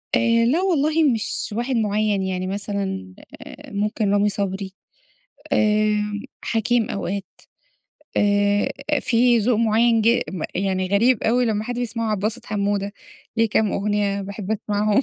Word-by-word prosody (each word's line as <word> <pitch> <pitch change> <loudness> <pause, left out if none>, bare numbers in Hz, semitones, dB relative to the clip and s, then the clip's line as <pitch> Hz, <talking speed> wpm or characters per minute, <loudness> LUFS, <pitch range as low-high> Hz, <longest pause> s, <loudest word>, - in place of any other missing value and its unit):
آآ 230 0 +3
لا 310 +9 +2
والله 320 -3 +2
مش 230 -5 -1
واحد 250 +2 -1
معيَّن، 210 -2 +1
يعني 185 -1 -2
مثلًا 195 - -4 0.3
آآ - - -11
ممكن 205 0 -1
رامي 205 0 +3
صبري، 195 -1 -3 0.8
آمم، 210 -2 +1 0.2
حكيم 230 0 +1
أوقات، 200 0 -3 0.9
آآ 205 0 +2 0.3
فيه 240 -1 +3
ذوق 240 0 +2
معيَّن 230 +1 +3
ج 235 +2 +4
م 185 -4 -5
يعني 185 0 0
غريب 220 +4 +3
أوي 245 +3 +2
لما 215 -2 -1
حد 245 +1 -4
بيسمعه، 230 -2 -2
عبدالباسط 215 +4 -2
حمودة، 200 -1 -1 0.4
ليه 225 -1 +3
كام 210 -1 +1
أغنيّة 200 0 0
باحب 200 +1 -6
أسمعهم 210 +2 +1
210 Hz, 135 wpm, -22 LUFS, 200-230 Hz, 0.9 s, ج